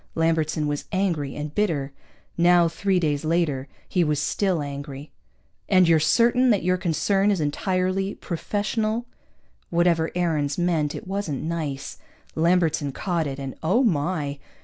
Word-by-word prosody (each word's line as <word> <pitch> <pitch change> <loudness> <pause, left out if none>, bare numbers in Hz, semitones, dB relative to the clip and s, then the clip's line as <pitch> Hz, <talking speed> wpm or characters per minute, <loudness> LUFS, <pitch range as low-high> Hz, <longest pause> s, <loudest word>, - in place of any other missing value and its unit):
Lambertson 160 -2 +1
was 145 -1 -2
angry 170 -8 -1
and 150 0 -5
bitter. 155 -9 -1 0.4
Now, 175 0 +5
three 185 +3 0
days 150 -3 0
later, 155 -5 0 0.2
he 180 - +1
was 150 -2 0
still 175 +1 0
angry. 140 0 -7 0.6
"And 185 -2 +5
you're 165 -1 +5
certain 240 +10 +3
that 205 -6 +2
your 180 +1 +2
concern 195 +4 +1
is 200 -3 +1
entirely 185 +5 -1
professional?" 215 +5 -2 0.6
(Whatever 170 -1 +2
Aarons 155 -5 0
meant, 165 -4 0
it - - -7
wasn't 190 -7 -3
nice. 155 -4 -4 0.3
Lambertson 160 -4 +1
caught 170 -2 -1
it, 135 -1 -5
and 135 -1 -5
oh, 190 +11 +2
my! 150 - 0
165 Hz, 140 wpm, -24 LUFS, 150-185 Hz, 0.6 s, Now